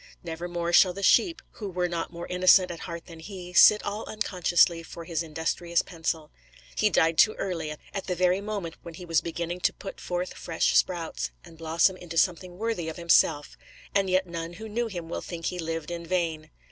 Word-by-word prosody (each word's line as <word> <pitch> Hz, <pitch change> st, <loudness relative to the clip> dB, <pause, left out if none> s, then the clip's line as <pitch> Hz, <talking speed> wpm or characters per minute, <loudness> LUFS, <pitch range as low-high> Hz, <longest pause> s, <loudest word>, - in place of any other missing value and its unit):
Never 170 Hz, 0 st, -5 dB
more 175 Hz, 0 st, -2 dB
shall 180 Hz, 0 st, +6 dB
the 200 Hz, +2 st, -7 dB
sheep, 335 Hz, -, +4 dB
who 205 Hz, -3 st, -6 dB
were 180 Hz, -1 st, -1 dB
not 170 Hz, -1 st, -3 dB
more 170 Hz, 0 st, -7 dB
innocent 180 Hz, 0 st, +5 dB
at 170 Hz, -, -7 dB
heart 170 Hz, -2 st, -7 dB
than 165 Hz, -2 st, -12 dB
he, 180 Hz, 0 st, -9 dB
sit 210 Hz, +3 st, +7 dB
all 205 Hz, +2 st, -3 dB
unconsciously 175 Hz, -5 st, +2 dB
for 165 Hz, 0 st, -9 dB
his 165 Hz, -1 st, -2 dB
industrious 165 Hz, +1 st, -1 dB
pencil. 165 Hz, -3 st, -4 dB, 0.4 s
He 60 Hz, -, +3 dB
died 160 Hz, 0 st, +2 dB
too 215 Hz, -, +6 dB
early, 165 Hz, -5 st, -3 dB, 0.2 s
at 195 Hz, -, -4 dB
the 180 Hz, -, -1 dB
very 180 Hz, +2 st, +2 dB
moment 200 Hz, -6 st, -5 dB
when 170 Hz, -1 st, -10 dB
he 180 Hz, -, -9 dB
was 165 Hz, -2 st, +2 dB
beginning 170 Hz, +1 st, -4 dB
to -, -, +2 dB
put 195 Hz, -, -9 dB
forth 180 Hz, +1 st, -3 dB
fresh 165 Hz, -2 st, 0 dB
sprouts, 165 Hz, -, +1 dB, 0.2 s
and 165 Hz, -, -14 dB
blossom 165 Hz, +3 st, +2 dB
into 170 Hz, -2 st, -8 dB
something 180 Hz, +1 st, +1 dB
worthy 220 Hz, -6 st, -2 dB
of 160 Hz, -, -7 dB
himself; 165 Hz, -3 st, +3 dB, 0.4 s
and 195 Hz, -1 st, +2 dB
yet 185 Hz, +1 st, +2 dB
none 170 Hz, -1 st, -6 dB
who 220 Hz, +6 st, -8 dB
knew 230 Hz, +2 st, -1 dB
him 175 Hz, -6 st, -6 dB
will 165 Hz, -, -4 dB
think 165 Hz, -2 st, -7 dB
he 180 Hz, -, -2 dB
lived 165 Hz, 0 st, -4 dB
in 170 Hz, 0 st, -4 dB
vain. 165 Hz, -3 st, -2 dB
175 Hz, 205 wpm, -27 LUFS, 165-185 Hz, 0.4 s, sit